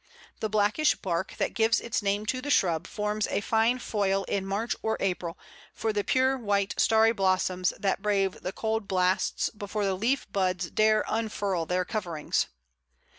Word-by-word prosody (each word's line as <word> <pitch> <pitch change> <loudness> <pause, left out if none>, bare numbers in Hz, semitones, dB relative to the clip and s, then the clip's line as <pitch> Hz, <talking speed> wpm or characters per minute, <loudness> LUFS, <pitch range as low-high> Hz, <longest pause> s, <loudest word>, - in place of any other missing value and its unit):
The 220 - -2
blackish 215 +9 +2
bark 180 0 -3
that - - -1
gives 225 0 +3
its 235 -2 -2
name 205 +1 0
to 255 +3 -1
the 290 - -5
shrub 175 - +2
forms 210 0 -1
a - - 0
fine 225 +4 +2
foil 200 -5 0
in 195 0 -2
March 210 +5 -1
or 220 0 -1
April 180 -3 -2 0.4
for 220 -1 -1
the 205 -1 0
pure 260 +3 +2
white 200 -3 0
starry 225 0 +5
blossoms 185 -3 +1
that 195 -1 0
brave 195 -2 0
the 185 - -3
cold 220 0 -2
blasts 185 0 +1
before 205 -1 -3
the 195 - +1
leaf 235 +8 0
buds 185 -2 -1
dare 215 0 +3
unfurl 205 -6 -1
their 180 0 0
coverings. 175 -9 -1
205 Hz, 170 wpm, -28 LUFS, 190-220 Hz, 0.4 s, starry